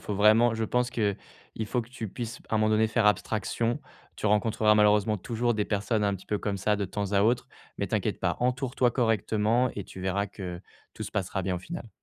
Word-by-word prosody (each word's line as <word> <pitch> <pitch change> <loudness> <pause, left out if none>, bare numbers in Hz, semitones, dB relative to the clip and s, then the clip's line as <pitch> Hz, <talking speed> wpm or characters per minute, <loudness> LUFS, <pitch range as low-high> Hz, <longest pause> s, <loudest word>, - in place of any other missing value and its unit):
faut 105 - -4
vraiment, 110 +3 +5
je 110 0 -1
pense 125 +2 0
qu'il 105 -5 0 0.5
faut 125 +4 0
que 115 - -10
tu 115 -3 -6
puisses 120 +4 -6
p - - -22
à 110 - +2
un - - +2
moment 110 0 +3
donné 110 +1 +3
faire 110 -1 +2
abstraction. 110 +2 0 0.4
Tu - - -2
rencontreras 105 0 +3
malheureusement 105 0 +4
toujours 120 +4 -1
des 105 -1 0
personnes 105 +2 0
un 100 -1 +2
petit 95 - -16
peu 105 - -1
comme 100 -1 -2
ça 105 +2 +1
de 105 -1 -1
temps 100 +1 -3
à 100 0 +4
autre. 115 +3 +2 0.3
Mais - - -1
t'inquiète - - -1
pas, - - 0
entoure-toi 125 0 +1
correctement 115 0 +1
et 100 - -4
tu 95 - -10
verras 95 +2 0
que 90 -3 -7 0.3
tout - - -6
se - - -8
passera 95 0 -1
bien 95 0 -1
au - - -2
final. 165 - -7
110 Hz, 230 wpm, -28 LUFS, 100-115 Hz, 0.5 s, vraiment